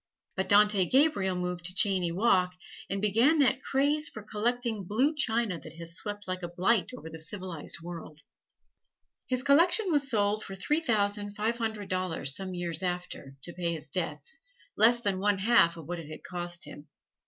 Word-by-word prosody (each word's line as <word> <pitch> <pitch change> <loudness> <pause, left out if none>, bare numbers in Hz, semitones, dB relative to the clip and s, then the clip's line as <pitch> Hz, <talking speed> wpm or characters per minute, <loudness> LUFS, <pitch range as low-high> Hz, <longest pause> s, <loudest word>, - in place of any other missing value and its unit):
But 190 - -2
Dante 205 -2 +5
Gabriel 260 - +3
moved 180 -1 -3
to 185 +1 -2
Cheyne 185 -4 +1
Walk, 185 -4 +2 0.3
and 195 +1 -3
began 230 +10 +4
that 265 -2 +3
craze 290 +4 +1
for 215 - -9
collecting 225 0 -1
blue 245 - +1
china 225 - +1
that 155 0 -11
has 165 0 -6
swept 205 +2 -5
like 185 0 -3
a 175 - -3
blight 185 +5 +1
over 160 - -10
the 160 0 -8
civilized 170 -2 -6
world. 165 -3 -8 1.1
His 255 0 -1
collection 345 +8 +4
was 285 -3 +1
sold 210 -2 +1
for 195 - -7
three 300 +11 0
thousand 205 -5 0
five 225 +3 -1
hundred 220 -3 -3
dollars 180 -7 -1
some 190 -1 -5
years 170 -2 -3
after 180 -6 -4
to 175 - -4
pay 170 -2 -1
his 155 -1 -9
debts 150 - -2 0.4
less 235 +2 +6
than 200 -5 -1
one 205 0 +2
half 195 -5 +4
of 165 - -9
what 175 +2 -4
it 155 -2 -9
had 155 - -9
cost 175 -1 -3
him. 145 - -11
195 Hz, 180 wpm, -29 LUFS, 175-230 Hz, 1.1 s, less